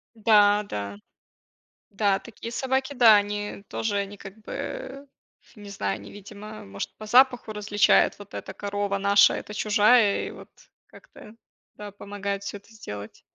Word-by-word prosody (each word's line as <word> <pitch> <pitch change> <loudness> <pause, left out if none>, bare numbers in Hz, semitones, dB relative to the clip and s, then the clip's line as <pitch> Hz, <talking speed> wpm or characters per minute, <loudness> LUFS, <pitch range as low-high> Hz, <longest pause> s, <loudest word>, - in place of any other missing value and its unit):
Да, 210 -2 +4
да. 100 -1 -5 0.9
Да, 200 -1 +1
такие 230 0 -9
собаки, 265 +2 -1
да, 230 -5 +7
они 205 0 -3
тоже, 215 -2 -2
они 200 +1 -4
как 195 +1 -12
бы, 275 - -7 0.5
не 205 -1 -11
знаю, 100 - -3
они 100 -1 -12
видимо, 210 +1 -10
может 100 0 -7
по 215 - -10
запаху 250 -1 +4
различают, 210 -1 +3
вот 205 +1 -13
эта 190 - -7
корова 205 0 -2
наша, 200 +1 +5
это - - -6
чужая 210 0 +3
и - - -6
вот - - -12 0.4
как-то, 210 - -16 0.4
да, 210 0 -9
помогают 200 0 -5
всё 200 - -5
это 200 +3 -16
сделать. 105 - -9
205 Hz, 150 wpm, -25 LUFS, 200-220 Hz, 0.9 s, да